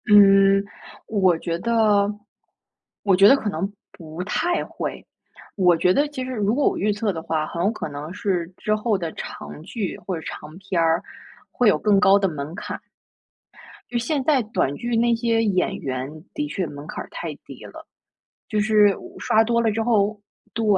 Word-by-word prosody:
嗯， 195 -1 +6 0.4
我 190 -5 +2
觉 170 0 -3
得 210 -2 +2 0.9
我 195 -3 +4
觉 195 +2 +7
得 270 - +8
可 220 -6 -2
能 195 +2 -3 0.2
不 165 +1 -8
太 345 - 0
会。 - - -6 0.5
我 180 -4 +4
觉 180 +2 +3
得 290 +6 +2
其 290 -3 -5
实 260 - -5
如 215 -2 0
果 290 - +2
我 - - +1
预 210 +2 +1
测 205 0 -1
的 165 - -5
话， 160 -1 -1
很 170 - -3
有 200 - +3
可 220 - -5
能 145 +2 -7
是 180 -3 -1
之 215 - -1
后 215 -1 0
的 170 -3 -4
长 - - -8
剧 195 +3 -4
或 185 - -4
者 160 - -6
是 - - -9
长 155 +2 -8
片 190 -2 -2
儿 165 +1 +2 0.5
会 245 -3 +3
有 - - +3
更 205 -2 +3
高 195 0 +6
的 195 -1 +1
门 155 -1 -5
槛。 - - -6 1.1
就 245 - 0
现 270 +4 -1
在 280 -2 +3
短 210 - -1
剧 240 0 -2
那 235 +1 +3
些 230 -1 +1
演 195 -4 +1
员 135 +4 -5
的 295 0 -2
确 195 -10 -2
门 145 -1 -9
槛 - - -5
儿 - - -16
太 - - -5
低 - - -11
了。 - - -11 0.6
就 215 - -1
是 210 -2 +4
我 - - -12
刷 220 +1 +3
多 235 +1 +1
了 230 -1 +2
之 225 +2 -1
后 215 -2 +1 0.3
对。 230 - -1
200 Hz, 210 characters per minute, -23 LUFS, 170-225 Hz, 1.1 s, 得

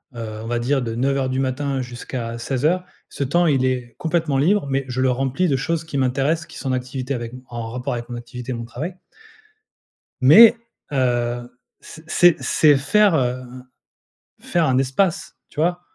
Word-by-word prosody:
heu - - -10
heu, 110 -2 -6
on - - -7
va 120 +1 -1
dire, 130 +4 0
de 115 -2 -4
9:00 135 +2 0
du 130 - -2
matin 135 +1 -1
jusqu'à 120 -1 -6
16:00. 145 +9 0 0.3
Ce - - -3
temps, 175 +6 +2
il 140 -5 +2
est 125 -2 -1
complètement 160 -4 0
libre, 190 +7 +2
mais 135 0 0
je 130 0 -2
le 130 -1 +3
remplis 135 +7 0
de 140 - +1
choses 165 +5 -1
qui 150 -3 -4
m'intéressent, 135 +5 0
qui - - -12
sont 135 - -4
en - - +1
activité 130 +1 -3
avec 120 -2 -5
m 125 - -10
en 120 -1 -5
rapport 125 +2 -4
avec 120 0 -5
mon 120 - -5
activité 120 +1 -7
et - - -3
mon 115 0 -6
travail. 150 +10 -6 1.3
Mais, 215 - +9 0.4
heu, 120 -2 0 0.3
c 160 - -12
c'est 175 0 +5
c'est 150 -3 +4
faire, 195 +7 +3
hem, 125 -1 -3 0.8
faire 170 -2 0
un 130 -2 +2
espace. 135 +7 0
Tu 150 - -6
vois? 175 +2 +1
130 Hz, 190 wpm, -21 LUFS, 125-150 Hz, 1.3 s, Mais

